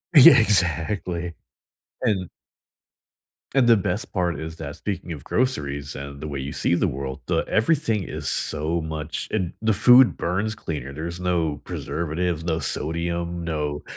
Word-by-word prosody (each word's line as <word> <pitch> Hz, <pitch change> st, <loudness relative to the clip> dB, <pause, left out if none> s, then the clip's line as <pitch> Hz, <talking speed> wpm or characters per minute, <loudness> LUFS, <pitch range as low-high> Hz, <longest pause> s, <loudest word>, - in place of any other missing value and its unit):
Yeah, 145 Hz, 0 st, +10 dB
exactly. 90 Hz, -3 st, +1 dB, 0.7 s
And 100 Hz, -8 st, 0 dB, 1.3 s
and 130 Hz, -3 st, +5 dB
the 115 Hz, -1 st, +7 dB
best 100 Hz, 0 st, -2 dB
part 90 Hz, -4 st, 0 dB
is 80 Hz, +1 st, -6 dB
that- 75 Hz, -3 st, -6 dB
speaking 90 Hz, 0 st, -4 dB
of 75 Hz, -5 st, -6 dB
groceries 70 Hz, -, -1 dB
and 70 Hz, 0 st, -7 dB
the 75 Hz, -, -4 dB
way 70 Hz, -2 st, -4 dB
you 70 Hz, +1 st, -4 dB
see -, -, +1 dB
the 95 Hz, -, +2 dB
world- 65 Hz, -3 st, -4 dB
the -, -, +2 dB
everything 110 Hz, -, +1 dB
is -, -, -5 dB
so 80 Hz, +3 st, -1 dB
much 80 Hz, 0 st, -4 dB
and 95 Hz, -5 st, -1 dB
the 110 Hz, 0 st, +2 dB
food 125 Hz, +5 st, +7 dB
burns 100 Hz, +6 st, -1 dB
cleaner. 75 Hz, -9 st, -5 dB
There's 85 Hz, +4 st, -5 dB
no 85 Hz, -5 st, 0 dB
preservatives, 85 Hz, +1 st, -2 dB
no 80 Hz, -1 st, 0 dB
sodium, 85 Hz, +2 st, -2 dB
no 75 Hz, -3 st, -2 dB
85 Hz, 150 wpm, -24 LUFS, 75-100 Hz, 1.3 s, Yeah